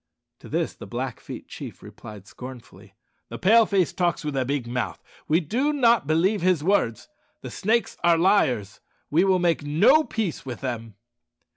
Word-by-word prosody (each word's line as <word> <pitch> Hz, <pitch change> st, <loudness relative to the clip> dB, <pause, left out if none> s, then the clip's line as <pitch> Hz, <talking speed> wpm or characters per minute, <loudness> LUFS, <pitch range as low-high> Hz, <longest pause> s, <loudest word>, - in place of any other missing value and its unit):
To -, -, -13 dB
this -, -, -1 dB
the -, -, -11 dB
Blackfeet -, -, -6 dB
chief -, -, -9 dB
replied 105 Hz, -3 st, -11 dB
scornfully, 125 Hz, +1 st, -12 dB, 0.3 s
"The -, -, -6 dB
Pale 225 Hz, +4 st, +5 dB
face 190 Hz, -4 st, +1 dB
talks 175 Hz, -4 st, -1 dB
with 150 Hz, -2 st, -3 dB
a 130 Hz, -1 st, 0 dB
big 140 Hz, -1 st, -2 dB
mouth. 120 Hz, +1 st, -3 dB, 0.3 s
We 155 Hz, +3 st, +3 dB
do 250 Hz, -, 0 dB
not 235 Hz, -, +3 dB
believe 175 Hz, +6 st, +2 dB
his 180 Hz, -4 st, +2 dB
words. 160 Hz, -, 0 dB, 0.3 s
The -, -, -8 dB
Snakes 225 Hz, +4 st, 0 dB
are 170 Hz, -1 st, +5 dB
liars; 125 Hz, -, +1 dB, 0.3 s
we 165 Hz, +5 st, +4 dB
will 190 Hz, -1 st, +3 dB
make 175 Hz, -3 st, +1 dB
no 160 Hz, -, +4 dB
peace 215 Hz, -, -3 dB
with 125 Hz, -3 st, -7 dB
them." 115 Hz, -5 st, -5 dB
165 Hz, 165 wpm, -24 LUFS, 130-200 Hz, 0.3 s, Pale